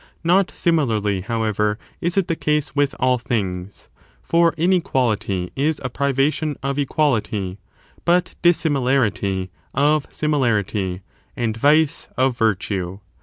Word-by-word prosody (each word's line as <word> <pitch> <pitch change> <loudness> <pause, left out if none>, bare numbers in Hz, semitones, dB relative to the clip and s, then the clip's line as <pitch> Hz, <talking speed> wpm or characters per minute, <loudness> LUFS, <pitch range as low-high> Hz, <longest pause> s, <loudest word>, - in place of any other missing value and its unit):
Not 180 +3 +3
similarly, 110 - 0
however, 105 -1 0 0.2
is 175 +3 -2
it 195 - +2
the 165 - 0
case 150 -2 -1
with 140 -1 +1
all 125 0 +2
things; 95 -5 -3 0.4
for 170 -1 +3
inequality 125 - 0
is 150 +3 0
a 125 - -3
privation 140 +3 0
of 140 +1 -1
equality, 110 - 0 0.4
but 175 +1 +2
dissimilarity 130 - +1 0.2
of 145 +2 +2
similarity, 105 -10 0 0.3
and 115 -2 -1
vice 150 +5 +2
of 130 -1 +2
virtue. 100 -5 -1
130 Hz, 115 wpm, -21 LUFS, 105-155 Hz, 0.4 s, Not